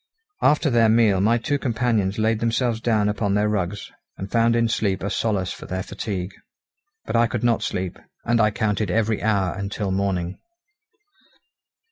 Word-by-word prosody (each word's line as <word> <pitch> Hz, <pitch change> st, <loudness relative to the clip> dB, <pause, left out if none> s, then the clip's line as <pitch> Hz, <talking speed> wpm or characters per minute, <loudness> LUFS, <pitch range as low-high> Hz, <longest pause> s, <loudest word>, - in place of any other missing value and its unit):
After 150 Hz, -1 st, +3 dB
their 115 Hz, -2 st, +4 dB
meal 110 Hz, -4 st, +4 dB
my 115 Hz, +4 st, +3 dB
two 140 Hz, +5 st, -1 dB
companions 115 Hz, -6 st, 0 dB
laid 110 Hz, 0 st, +1 dB
themselves 115 Hz, 0 st, 0 dB
down 110 Hz, -3 st, +2 dB
upon 105 Hz, -1 st, 0 dB
their 105 Hz, +1 st, +2 dB
rugs, 100 Hz, -1 st, -3 dB, 0.3 s
and 95 Hz, +1 st, -7 dB
found 115 Hz, 0 st, +3 dB
in 115 Hz, 0 st, +2 dB
sleep 100 Hz, -4 st, -1 dB
a 100 Hz, -, -2 dB
solace 100 Hz, -5 st, -1 dB
for -, -, -11 dB
their 95 Hz, 0 st, -3 dB
fatigue. 95 Hz, -2 st, -4 dB, 0.7 s
But -, -, -3 dB
I 115 Hz, 0 st, +4 dB
could -, -, -4 dB
not 120 Hz, -1 st, +2 dB
sleep, 90 Hz, -1 st, -3 dB, 0.3 s
and 120 Hz, 0 st, +2 dB
I 105 Hz, -, +4 dB
counted 105 Hz, -1 st, -1 dB
every 110 Hz, +2 st, 0 dB
hour 100 Hz, -5 st, +1 dB
until 100 Hz, 0 st, -3 dB
morning. 95 Hz, -2 st, -1 dB
105 Hz, 165 wpm, -23 LUFS, 100-115 Hz, 0.7 s, their